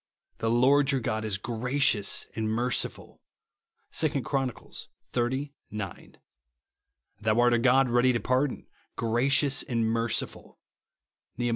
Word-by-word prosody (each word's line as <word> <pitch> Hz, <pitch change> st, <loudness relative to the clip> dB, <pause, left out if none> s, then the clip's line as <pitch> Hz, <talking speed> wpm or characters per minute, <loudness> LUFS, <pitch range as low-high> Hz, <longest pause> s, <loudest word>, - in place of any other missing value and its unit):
The 115 Hz, -, 0 dB
Lord 135 Hz, +4 st, +4 dB
your 135 Hz, -, +1 dB
God 110 Hz, -2 st, -2 dB
is 105 Hz, -3 st, -1 dB
gracious 120 Hz, 0 st, +1 dB
and 110 Hz, -1 st, -2 dB
merciful,'' 120 Hz, +2 st, -2 dB, 0.7 s
(2 145 Hz, -4 st, 0 dB
Chron. 135 Hz, +1 st, 0 dB
xxx. 125 Hz, +3 st, -5 dB, 0.2 s
9). 105 Hz, -4 st, -7 dB, 0.5 s
" 60 Hz, -, -45 dB
Thou 110 Hz, +1 st, +1 dB
art 120 Hz, 0 st, +4 dB
a 120 Hz, -, +3 dB
God 130 Hz, +2 st, +4 dB
ready 120 Hz, +1 st, +3 dB
to 120 Hz, -, 0 dB
pardon, 130 Hz, +3 st, -1 dB, 0.3 s
gracious 135 Hz, +5 st, +2 dB
and 115 Hz, -2 st, -1 dB
merciful," 115 Hz, 0 st, -2 dB, 0.8 s
(iSTeh. 120 Hz, -1 st, 0 dB
120 Hz, 125 wpm, -27 LUFS, 115-135 Hz, 0.8 s, Lord